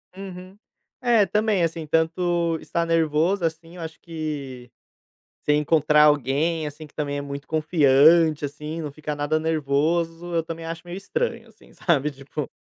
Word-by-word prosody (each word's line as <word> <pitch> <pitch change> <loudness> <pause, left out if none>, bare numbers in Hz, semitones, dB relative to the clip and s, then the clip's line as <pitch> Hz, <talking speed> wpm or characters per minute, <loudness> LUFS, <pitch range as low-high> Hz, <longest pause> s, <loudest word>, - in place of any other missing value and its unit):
Uhum. 185 0 -9 0.4
É, 235 -4 +4
também. 210 -1 +1
Assim, 165 -1 -2
tanto 165 +1 +1
estar 170 0 -1
nervoso, 165 +3 +1
assim, 165 +1 -4
eu 175 - -8
acho 160 0 -7
que 145 -6 -6 0.7
você 150 - +2
encontrar 150 0 +4
alguém, 150 +3 +2
assim, 150 +2 -9
que - - -26
também 145 -2 -3
é - - -2
muito 140 0 -7
confiante, 155 0 +4
assim, 150 +3 -6
não 150 -2 -5
fica 150 +1 -5
nada 145 +2 0
nervoso, 165 +3 0
eu 165 - +1
também 165 0 -7
acho 165 0 -5
meio 175 +1 -6
estranho, 475 - -3
assim, - - -21
sabe, 150 -4 +1
tipo 140 +1 -6
160 Hz, 155 wpm, -24 LUFS, 150-170 Hz, 0.7 s, É